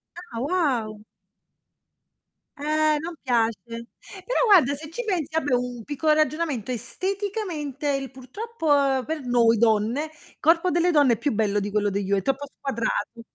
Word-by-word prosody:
Ah, 345 -10 -8
wow. 250 - -1 1.6
Eh, 305 +1 +2
non 340 +3 -5
piace. 230 -6 +1 0.6
Però - - 0
guarda, 350 - +6
se 305 +2 -7
ci 485 +9 -5
pensi, 340 - -2
vabbè 290 -4 +1
un 245 -2 -1
piccolo 300 +3 +1
ragionamento, 305 -5 0
esteticamente 370 - -3
il 275 -1 -1
purtroppo, 280 - 0
per 315 -1 -3
noi 235 -2 +4
donne, 225 +5 +2
il 310 -1 -18
corpo 330 +3 +3
delle 345 +2 +2
donne 290 -7 +5
è - - -1
più 285 -1 0
bello 210 -1 +1
di 205 +1 -3
quello 205 0 0
degli 195 0 -2
uo 200 - +3
è - - 0
troppo 270 +5 -1
squadrato. 235 -3 -2
280 Hz, 155 wpm, -25 LUFS, 235-320 Hz, 1.6 s, guarda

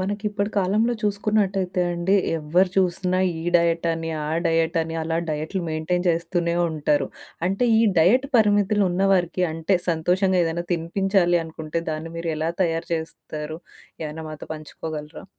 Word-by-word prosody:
మనకి 205 +3 -3
ఇప్పటి 205 0 -2
కాలంలో 210 +5 +2
చూసుకున్నట్టయితే 200 -3 0
అండి. 175 +3 +1 0.2
ఎవ్వరు 175 +5 +2
చూసినా 185 0 +1 0.2
ఈ - - -6
డైట్ 170 0 +1
అని, 165 0 -3 0.2
ఆ - - -3 0.2
డైట్ 165 +1 +1
అని, 165 0 -5
అలా 165 +1 -1
డైట్‌లు 155 +5 -2
మెయింటైన్ 175 +3 -1
చేస్తూనే 170 0 0 0.2
ఉంటారు. 150 -1 +1 0.4
అంటే 195 +6 +1
ఈ - - +5 0.2
డైట్ 230 +12 +4
పరిమితులు 205 -1 +3
ఉన్న 185 +2 +1
వారికి 180 -1 +1
అంటే 165 +4 +1
సంతోషంగా 180 +3 +2
ఏదైనా 165 +1 -2
తినిపించాలి 175 +1 +2
అనుకుంటే, 160 0 -4
దాన్ని 155 +1 -4
మీరు 165 0 -2
ఎలా 160 +2 -1
తయారు 165 0 -1
చేస్తారు? 155 -1 -6 0.4
ఏమైనా 155 +1 -5
మాతో 155 - -9
పంచుకోగలరా? 155 0 -7
170 Hz, 145 wpm, -23 LUFS, 160-190 Hz, 0.4 s, ఈ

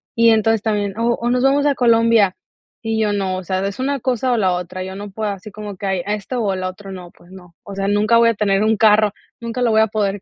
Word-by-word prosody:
y 230 0 +5
entonces 225 0 +2
también, 205 -3 -2
o 235 +1 +1
o 235 - -3
nos 250 0 +1
vamos 280 +2 +3
a 290 - +3
Colombia, 230 -5 +3 0.5
y 225 -1 -1
yo 210 -1 +1
no, 190 -2 -2
o 185 - -6
sea, 185 +2 -2
es 200 - -7
una 275 +2 -1
cosa 255 0 -1
o - - +1
la 190 -4 +2
otra, 180 +1 -5
yo 190 0 -7
no 205 +1 -7
puedo 215 +1 -3
así 200 +2 -8
como 210 -1 -8
que 200 - -5
hay 190 -2 -1
esto 210 +5 -3
o 195 -2 0
lo 185 0 -3
otro 195 +1 -11
no, 180 -2 -9
pues 175 - -21
no, 180 -3 -15
o 200 - -9
sea, 195 0 -2
nunca 210 +3 +3
voy 230 0 +5
a 230 - 0
tener 200 -1 +1
un 220 0 +2
carro, 215 0 +4 0.3
nunca 235 +2 -4
lo 235 - +2
voy 220 0 +4
a 220 - +3
poder 205 -2 -2
210 Hz, 275 wpm, -19 LUFS, 195-230 Hz, 0.5 s, y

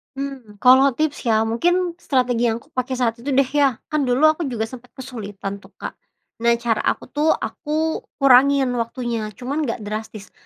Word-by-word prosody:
Hmm, 270 -6 -6
kalau 260 +1 +6
tips 300 -3 -2
ya, 220 -1 +3
mungkin 350 +11 +1
strategi 245 -5 +1
yang 225 - +1
aku - - -28
pakai 255 0 -2
saat 235 -2 0
itu 270 +2 -2
deh 275 -1 +3
ya, 280 -3 +3 0.2
kan 300 -3 +1
dulu 250 +4 +1
aku 310 -1 -4
juga 235 -4 -2
sempat 250 +2 -8
kesulitan 205 -6 -6
tuh, - - -20
Kak. - - -6 0.5
Nah, 235 0 +3
cara 230 -2 -1
aku - - 0
tuh 300 +2 +2
aku 315 +1 -2 0.2
kurangin 275 0 +5
waktunya, 230 -1 -3
cuman 285 +4 -3
nggak 230 -2 -4
drastis. 215 0 -6
250 Hz, 180 wpm, -21 LUFS, 230-280 Hz, 0.5 s, kalau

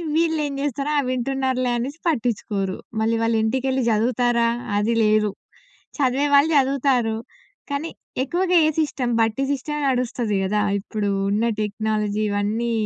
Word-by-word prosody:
వీళ్ళేం 320 -3 +1
జేస్తారు, 285 +1 -2
ఆ! - - +5
వింటున్నారులే 255 0 0
అనేసి 275 +7 -4
పట్టిచ్చుకోరు. 215 - -1 0.2
మళ్ళీ 225 +1 +2
వాళ్ళింటికెళ్ళి 250 +4 +1
జదువుతారా, 235 +1 +2 0.3
అది 220 +3 +1
లేదు. 215 -1 +3 0.7
చదివే 275 +1 +2
వాళ్ళు 285 +3 +5
జదువుతారు, 260 -4 +2 0.5
కానీ 290 +4 -2 0.3
ఎక్కువగా 360 +5 0
ఏ - - +3
సిస్టమ్, 265 -5 -1
బట్టి 225 +4 +1
సిస్టమే 295 +2 -3
నడుస్తది 245 -4 -1
గదా! 210 +2 +1 0.2
ఇప్పుడు 205 0 -3 0.2
ఉన్న 215 +3 +1 0.2
టెక్నాలజీ 215 0 -1
ఇవన్నీ 210 +4 -1
245 Hz, 120 wpm, -22 LUFS, 215-275 Hz, 0.7 s, ఆ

